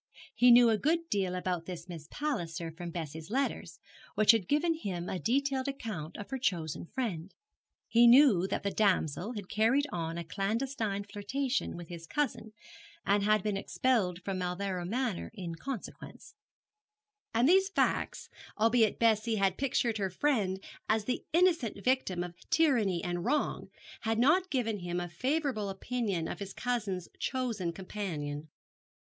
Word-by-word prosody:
He 245 - +5
knew 240 -1 +8
a 215 - +1
good 330 +5 0
deal 190 -3 0
about 180 -2 -2
this 175 -1 -7
Miss 165 -4 -8
Palliser 170 - -3
from 175 +1 -7
Bessie's 160 -1 -6
letters, 235 -9 -2 0.4
which 215 0 +7
had 225 -6 0
given 315 +3 +2
him 185 - -4
a 185 - -3
detailed 270 +4 0
account 210 - -5
of 205 - -8
her 265 - -2
chosen 170 - -2
friend. 195 -9 -3 0.6
He 235 +1 +6
knew 235 -8 +7
that 195 - -2
the 200 - 0
damsel 195 - +1
had 205 -5 -6
carried 230 +9 +2
on 165 -1 -3
a 170 - -3
clandestine 210 +3 -2
flirtation 215 +5 -2
with 170 -2 -9
his 170 -1 -8
cousin, 235 -6 -2 0.5
and 200 +1 +3
had 215 -1 +3
been 210 -2 0
expelled 195 -6 0
from 195 -2 -2
Mauleverer 180 0 -2
Manor 235 -2 -2
in 175 -5 -5
consequence; 255 - -8 1.0
and 235 +3 +3
these 380 +3 +5
facts, - - 0 0.3
albeit 225 0 +3
Bessie 225 0 +2
had 195 -2 +2
pictured 240 -4 0
her 195 -1 0
friend 195 -4 0 0.3
as 220 -1 +2
the 250 - -2
innocent 330 - +2
victim 250 -9 +1
of 175 -1 -7 0.2
tyranny 250 - +2
and 175 -1 -2
wrong, 295 +6 0 0.3
had 225 -1 -1
not 330 +10 +4
given 225 - -1
him 175 0 -3
a 175 - -3
favourable 255 - -1
opinion 195 -4 -2
of - - -5
his 200 -1 -6
cousin's 215 -8 -2
chosen 230 -9 -1
companion. 160 -6 -5
210 Hz, 155 wpm, -31 LUFS, 180-250 Hz, 1.0 s, knew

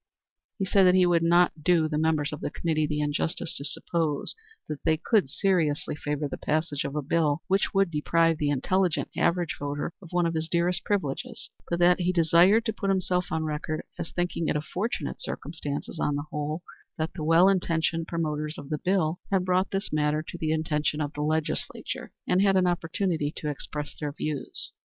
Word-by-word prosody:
He 195 - -1
said 195 0 +4
that 180 - +5
he 185 -1 +5
would 175 -1 +3
not 170 -1 +3
do 165 -2 +4
the 150 -1 -1
members 155 -2 +1
of 150 - -6
the - - -2
committee 155 -1 0
the 150 0 -1
injustice 150 +3 -1
to - - -5
suppose 155 0 -1 0.3
that 150 -2 -5
they 160 -1 +3
could 190 - +2
seriously 155 -1 +1
favor 150 0 -2
the - - -6
passage 155 -2 -1
of 140 +1 -4
a 150 - -1
bill 155 +1 +1
which 195 +2 +1
would 195 -3 +3
deprive 165 +1 +2
the 145 - +1
intelligent 175 +5 +1
average 170 -3 +1
voter 145 +3 -3
of 180 - -12
one 175 0 +1
of 165 - 0
his 160 0 -2
dearest 175 +1 +1
privileges; 205 - -2 0.2
but 170 - 0
that 175 +1 +5
he 180 0 +2
desired 175 +5 +5
to 220 - 0
put 195 -1 -2
himself 180 -2 +1
on 160 0 -1
record 155 0 -3 0.2
as - - -3
thinking 175 -2 -1
it - - +1
a 150 - +1
fortunate 185 +10 -3
circumstance, 145 -1 -4
on 145 - +1
the 145 +1 -3
whole, 150 +3 -3 0.3
that 160 +1 -2
the 160 - -5
well 165 +4 +6
intentioned 165 -3 +1
promoters 155 -2 -2
of 145 +1 -9
the 150 - -1
bill 180 -2 +1
had 190 -2 +1
brought 185 +1 +2
this 195 -2 -3
matter 150 0 +1
to - - -7
the 160 -2 -1
attention 150 -1 0
of 145 -1 -2
the 150 - -4
legislature, 155 +1 -2
and 185 - +3
had 195 -1 +4
an 185 - +4
opportunity 170 -2 0
to 150 - -3
express 145 +1 -5
their 150 -2 -2
views. 150 -2 -4
160 Hz, 200 wpm, -27 LUFS, 150-180 Hz, 0.3 s, well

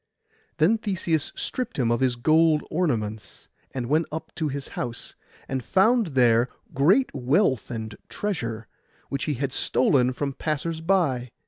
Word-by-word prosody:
Then 185 +8 +3
Theseus 170 -7 -1
stript 255 - -4
him 120 -4 +1
of 120 - +1
his 130 -2 +2
gold 155 +4 +3
ornaments, 115 -11 -2 0.2
and 130 -2 -4
went 155 +6 +1
up 160 +1 -6
to 160 - -2
his 140 -1 -4
house, 120 -1 -5 0.3
and 130 -2 -3
found 220 - +3
there 120 -1 +4 0.2
great 185 - +3
wealth 135 - +1
and 110 -2 -5
treasure, 115 - -3 0.4
which 140 - -2
he 150 - -1
had 135 +1 -3
stolen 130 -1 +2
from 140 +2 -3
the 135 - -16
passers 160 +1 -2
by. 160 -9 +1
140 Hz, 150 wpm, -25 LUFS, 125-165 Hz, 0.4 s, there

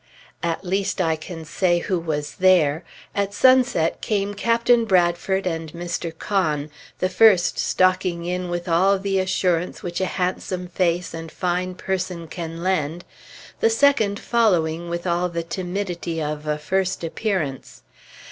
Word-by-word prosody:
At 170 +3 -2
least, 195 +2 -1
I 165 -3 +2
can 160 +1 -8
say 175 +3 +1
who 180 +1 -1
was 150 -3 -4
there. 175 -4 +4 0.3
At 200 0 -1
sunset 255 -11 +3
came 205 -1 -1
Captain 235 +2 +2
Bradford 185 0 +2
and 165 -3 -3
Mr. 175 0 -4
Conn, 155 -8 -1 0.3
the 185 - +1
first 190 -1 +4
stalking 185 -2 +1
in 180 0 -2
with 175 +1 -3
all 185 +4 +3
the 195 0 0
assurance 180 -2 0
which 175 +1 -3
a - - +2
handsome 180 0 -2
face 175 -1 0
and 165 -1 -7
fine 180 0 -2
person 185 -3 -3
can 165 0 -6
lend, 175 -2 -1 0.5
the 225 - +4
second 225 -4 +3
following 175 -8 +1
with 170 +1 -4
all 175 0 +1
the 170 -1 -3
timidity 175 -1 -4
of 150 0 -4
a 150 0 0
first 185 +4 -1
appearance.... 165 - -3
180 Hz, 145 wpm, -22 LUFS, 165-190 Hz, 0.5 s, there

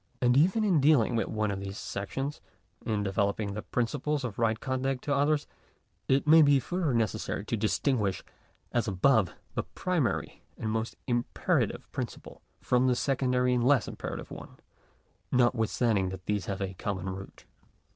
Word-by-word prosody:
And 125 0 +3
even 185 +10 +4
in 180 -8 +3
dealing 135 -5 +4
with 115 - 0
one 110 -1 -1
of 95 - -3
these 100 0 -6
sections 135 +9 -4 0.2
— - - -30
in 105 -2 0
developing 100 +1 0
the 105 - -4
principles 140 +6 -1
of 115 -4 -5
right 115 -1 +1
conduct 130 0 -2
to 145 - 0
others, 145 +1 +2 0.6
it 135 +1 +2
may 160 +2 +8
be 145 -2 +5
further, 170 +3 -1
necessary 110 -3 -1
to 115 - -1
distinguish, 110 -1 0 0.5
as 120 -2 0
above, 100 0 +3 0.2
the - - 0
primary 175 -9 -2 0.2
and 110 - -3
most 110 +1 -2
imperative 120 -2 0
principle, - - -6 0.2
from 125 +1 +2
the 125 - +3
secondary 125 -1 +1
and 120 -1 +1
less 130 -1 +3
imperative - - -6
one; - - -10 0.7
notwithstanding 115 -5 +2
that 95 -1 -8
these 105 -2 -1
have 100 0 -3
a 95 0 -4
common 95 -1 -4
root. 95 +1 -9
120 Hz, 160 wpm, -29 LUFS, 105-135 Hz, 0.7 s, may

